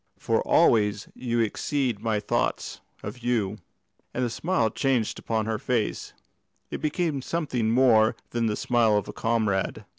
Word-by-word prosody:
"For - - 0
always 105 -2 +3
you 120 -2 -1
exceed 120 +1 -1
my 110 -2 0
thoughts 105 - -2 0.2
of 105 +5 -6
you;" 110 -4 -1 0.6
and 125 - +1
the 120 - -3
smile 160 -7 0
changed 130 -6 0
upon 110 -1 -1
her 110 -1 -2
face 120 -4 -2 0.6
it - - -4
became 155 -2 -1
something 130 -7 -1
more 115 -2 +4 0.2
than 120 -1 0
the 105 - 0
smile 115 -3 +2
of 105 - -2
a - - -7
comrade. 110 -4 -1
115 Hz, 150 wpm, -26 LUFS, 110-125 Hz, 0.6 s, more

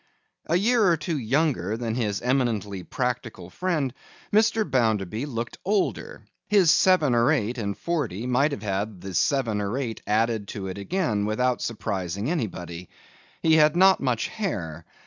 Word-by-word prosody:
A 165 - +1
year 225 +5 +3
or 170 -2 +4
two 160 +2 -3
younger 120 - 0
than 115 -1 -3
his 110 -4 -2
eminently 115 -7 0
practical 120 -6 -4
friend, 155 - -1 0.4
Mr. 220 0 +3
Bounderby 110 -1 0
looked 120 -3 -5
older; 200 +1 -1 0.2
his 195 -6 +5
seven 175 -6 +4
or 120 +3 +4
eight 125 -4 0
and 100 -2 -3
forty 130 - -2
might 130 +4 +2
have 110 -7 -5
had 100 -1 -3
the 95 -1 -7
seven 115 - +1
or 100 +5 -2
eight 120 -5 -4
added 110 -1 +1
to 100 -1 -6
it 95 +1 -5
again, 105 - -1
without 125 +3 0
surprising 100 - -3
anybody. 90 - -4 0.5
He 160 -1 +5
had 150 0 +5
not 190 +1 +6
much 125 -4 -1
hair. 85 - -4
120 Hz, 155 wpm, -25 LUFS, 105-155 Hz, 0.5 s, not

